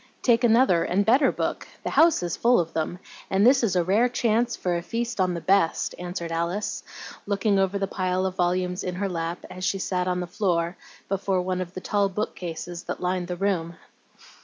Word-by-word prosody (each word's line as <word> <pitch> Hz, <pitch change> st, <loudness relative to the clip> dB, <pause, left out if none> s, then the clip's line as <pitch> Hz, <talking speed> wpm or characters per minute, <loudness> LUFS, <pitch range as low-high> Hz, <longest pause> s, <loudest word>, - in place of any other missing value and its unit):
"Take 235 Hz, -1 st, +4 dB
another 230 Hz, -7 st, +4 dB
and 185 Hz, +3 st, +1 dB
a -, -, -12 dB
better 265 Hz, +5 st, +4 dB
book; -, -, -3 dB, 0.2 s
the -, -, -3 dB
house 325 Hz, -, +4 dB
is 175 Hz, -1 st, -2 dB
full 240 Hz, +1 st, +4 dB
of 165 Hz, -1 st, -2 dB
them, 160 Hz, +2 st, -2 dB, 0.3 s
and 195 Hz, +2 st, +3 dB
this 265 Hz, +2 st, +6 dB
is 220 Hz, -6 st, +1 dB
a 180 Hz, -, +3 dB
rare 210 Hz, +8 st, +3 dB
chance 240 Hz, 0 st, +1 dB
for 180 Hz, -1 st, -1 dB
a 170 Hz, -, -1 dB
feast 230 Hz, +4 st, -2 dB
on 180 Hz, -1 st, +1 dB
the 170 Hz, -, -4 dB
best," 190 Hz, -3 st, +2 dB
answered 175 Hz, -1 st, -5 dB
Alice, 170 Hz, +5 st, -2 dB, 0.5 s
looking 200 Hz, 0 st, +1 dB
over 195 Hz, +1 st, +1 dB
the 195 Hz, -, 0 dB
pile 185 Hz, -1 st, -1 dB
of 185 Hz, -1 st, -2 dB
volumes 180 Hz, 0 st, 0 dB
in 180 Hz, -1 st, -3 dB
her 200 Hz, +2 st, -1 dB
lap, 170 Hz, -1 st, -4 dB
as 185 Hz, -, -8 dB
she 195 Hz, -, +1 dB
sat 180 Hz, 0 st, -1 dB
on 180 Hz, 0 st, 0 dB
the 180 Hz, -, -2 dB
floor 170 Hz, -2 st, -1 dB, 0.3 s
before 190 Hz, -1 st, 0 dB
one 185 Hz, 0 st, -2 dB
of 180 Hz, 0 st, -7 dB
the 185 Hz, -, -5 dB
tall 200 Hz, 0 st, +1 dB
book 210 Hz, +3 st, -3 dB
cases 175 Hz, 0 st, -6 dB
that -, -, -4 dB
lined 180 Hz, 0 st, -1 dB
the 180 Hz, -1 st, -4 dB
room. 175 Hz, -4 st, -1 dB
185 Hz, 215 wpm, -25 LUFS, 175-205 Hz, 0.5 s, this